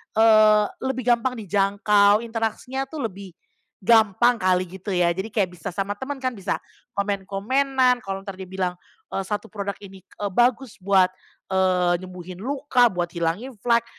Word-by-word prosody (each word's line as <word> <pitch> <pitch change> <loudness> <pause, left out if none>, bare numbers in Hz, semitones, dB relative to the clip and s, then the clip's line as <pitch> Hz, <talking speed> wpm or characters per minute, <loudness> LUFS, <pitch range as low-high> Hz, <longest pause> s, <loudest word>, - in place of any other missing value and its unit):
eee, 215 -1 +6 0.2
lebih 255 -2 -2
gampang 240 +1 +2
dijangkau, 205 +1 +3
interaksinya 230 +4 -3
tuh 280 -6 -3
lebih 195 -1 -11 0.5
gampang 225 +2 +4
kali 185 0 +2
gitu 190 +3 -9
ya 175 -2 +2
jadi 190 +5 -4
kayak 195 -4 -1
bisa 165 - -6
sama 195 +2 -2
temen 265 +6 -6
kan 255 -1 -2
bisa 195 -5 -2 0.4
komen-komenan, 245 +6 +1
kalau 195 0 -6
entar 195 - -5
dia 185 -1 -10
bilang, 185 -1 -2 0.4
eee, - - 0
satu 210 +3 -4
produk 200 -1 -4
ini, 195 -2 -12
eee, 205 -2 -6
bagus 240 -1 +1
buat, 190 -1 +4 0.5
eee, 180 -2 +2
nyembuhin 185 0 -9
luka, 265 -1 +2
buat 175 -3 -2
hilangin 170 +10 -2
flek, 235 0 +2
205 Hz, 155 wpm, -23 LUFS, 190-235 Hz, 0.5 s, eee